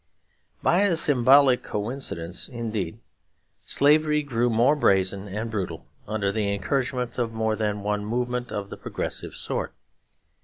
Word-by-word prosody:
By 175 - +3
a 200 -4 +4
symbolic 135 -3 +5
coincidence, 105 -6 -4
indeed, 110 -6 -4 0.7
slavery 150 +1 +3
grew 120 -3 0
more 120 +6 +3
brazen 95 -6 +1
and 110 +3 -4
brutal 90 -6 -4 0.2
under 105 -2 -1
the 100 -1 -1
encouragement 130 +1 -2
of 115 -2 -1
more 110 -1 0
than 105 -2 -2
one 105 0 -1
movement 125 +2 -2
of 100 -1 -5
the - - -7
progressive - - -4
sort. - - -3
115 Hz, 130 wpm, -25 LUFS, 105-130 Hz, 0.7 s, symbolic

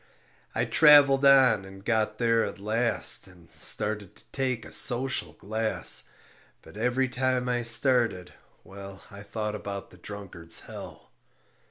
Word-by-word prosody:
I - - 0
traveled 145 -3 +5
on 135 -7 +5
and 95 +1 -14
got 110 -2 -1
there 115 -1 +1
at - - -6
last 110 +1 +1
And 90 -2 -19
started 105 -2 -1
to - - -19
take 130 -4 -3
a - - -13
social 130 +1 0
glass; 110 +2 -1 0.5
But - - -16
every 125 +4 -1
time 125 0 -2
I 120 -1 -1
started, 115 -5 +2 0.3
well, 100 0 -12
I 100 0 -11
thought 105 +1 -5
about 100 -2 -7
the 90 - -17
Drunkard's 95 -4 -6
Hell. - - -12
110 Hz, 140 wpm, -26 LUFS, 100-125 Hz, 0.5 s, traveled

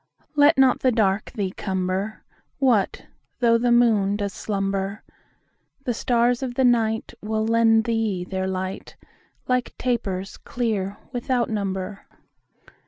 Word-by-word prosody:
10 - - -36
Let 290 +1 +5
not 265 -1 +4
the 255 - +3
dark 215 -3 +1
thee 200 -6 -2
cumber: 190 +2 -3 0.3
What 240 -8 +1 0.3
though 230 -2 +3
the 240 0 +2
moon 220 -5 +4
does 200 -1 -3
slumber? 195 0 -2 0.8
The 245 - -1
stars 240 +1 +1
of 250 -2 -4
the 265 - +3
night 225 -2 +1
Will 215 +1 -1
lend 225 0 +4
thee 220 -5 -1
their 190 +1 -3
light 190 0 -4 0.5
Like 250 -1 -1
tapers 200 -6 -2
clear 205 -5 -2 0.2
without 245 -1 0
number. 195 -1 -3
220 Hz, 130 wpm, -23 LUFS, 195-240 Hz, 0.8 s, Let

